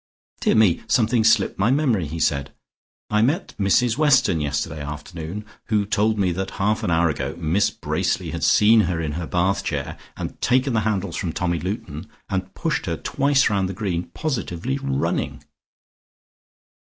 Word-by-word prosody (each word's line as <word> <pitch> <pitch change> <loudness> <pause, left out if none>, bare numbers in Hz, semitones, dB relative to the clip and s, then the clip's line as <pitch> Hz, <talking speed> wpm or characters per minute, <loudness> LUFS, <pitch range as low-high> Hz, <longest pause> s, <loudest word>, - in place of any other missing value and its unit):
"Dear - - +2
me, 105 -6 +4
something 115 -1 +2
slipped 110 -4 +3
my 100 +4 +3
memory," 125 - +1
he 80 +3 -5
said. 70 -3 0 0.6
"I 105 0 +3
met 140 +9 0
Mrs 115 +5 +2
Weston 130 - +4
yesterday 75 +1 -2
afternoon, 80 +7 -6 0.2
who 105 -2 +1
told 105 +2 +1
me 95 -3 +2
that 95 +2 -3
half 105 +2 +1
an - - -1
hour 85 0 +3
ago - - -4
Miss 85 +5 +1
Bracely - - -2
had - - -4
seen 110 +2 +5
her 85 -2 -1
in 80 -2 -2
her 85 +2 -4
bath 95 +2 +1
chair - - -4 0.2
and - - -4
had - - -27
taken 130 +1 +2
the 110 - +2
handles 100 -4 -2
from 85 -4 -3
Tommy 85 -2 -1
Luton, 90 -3 -5 0.2
and 95 -2 -3
pushed - - -2
her - - -1
twice 140 0 +2
round 100 -3 0
the - - -4
green, 90 -4 -2
positively 130 - -2
running." 70 0 -2
95 Hz, 170 wpm, -22 LUFS, 85-110 Hz, 0.6 s, seen